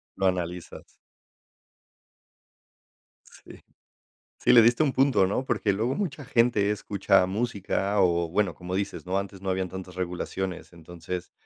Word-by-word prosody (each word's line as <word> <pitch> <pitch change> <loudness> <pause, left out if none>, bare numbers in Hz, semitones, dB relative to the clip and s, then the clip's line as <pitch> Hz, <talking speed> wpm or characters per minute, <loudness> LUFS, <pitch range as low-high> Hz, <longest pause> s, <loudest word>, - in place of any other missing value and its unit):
Lo 95 - +1
analizas. 90 -1 -4 2.3
Sí. - - -15 0.8
Sí, - - +3
le 115 -2 +9
diste 120 +6 +4
a 155 - +3
un 135 - 0
punto, 130 -8 +3
¿no?, 105 +7 -1
porque 105 -5 0
luego 115 +6 -1
mucha 150 -8 -3
gente 115 -5 +2
escucha 100 -2 +2
música 100 -1 -2
o, 85 -2 +2
bueno, 95 +1 0
como 90 0 -6
dices, 100 0 -3
¿no?, 95 +2 0
antes 100 -1 -6
no 95 - -2
habían 95 0 -1
tantas 90 0 -9
regulaciones, 90 0 -4
entonces, 85 +1 -7
95 Hz, 140 wpm, -26 LUFS, 90-110 Hz, 2.3 s, le